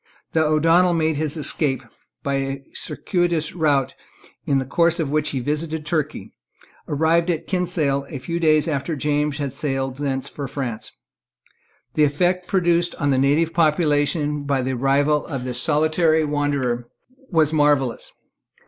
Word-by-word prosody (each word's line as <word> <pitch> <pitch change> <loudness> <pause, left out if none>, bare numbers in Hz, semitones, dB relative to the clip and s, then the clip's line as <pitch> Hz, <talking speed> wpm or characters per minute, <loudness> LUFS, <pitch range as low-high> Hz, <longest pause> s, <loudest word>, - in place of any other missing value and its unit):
The 160 - +2
O'Donnel 165 +3 +3
made 160 -2 +1
his 155 +1 -2
escape, 145 -2 0
and - - -23 0.3
by 140 - -1
a 135 0 -3
circuitous 175 -4 -1
route, 145 -6 +1 0.5
in 140 - +3
the 135 - -1
course 170 +6 +2
of 150 -4 -1
which 150 0 +1
he 135 - -2
visited 150 +4 -2
Turkey, 155 -2 -3 0.5
arrived 165 +3 +2
at 165 -3 -1
Kinsale 160 -7 -1
a 145 - -5
few 165 +7 -4
days 155 -1 +3
after 155 +1 -2
James 150 0 0
had 140 -3 -3
sailed 135 -2 -2
thence 135 -2 -2
for 140 -2 -6
France. 125 -5 -5 1.0
The 155 - +3
effect 180 +5 +1
produced 175 -2 +1
on 145 -3 0
the 130 - +2
native 150 +5 +2
population 150 -2 +1
by 140 -2 0
the 130 +1 -1
arrival 140 +4 +2
of 135 -3 -4
this 125 -1 -2
solitary 155 +1 +2
wanderer 140 -5 -1 0.4
was 160 -4 +2
marvellous. 145 -5 +1
150 Hz, 150 wpm, -22 LUFS, 140-160 Hz, 1.0 s, O'Donnel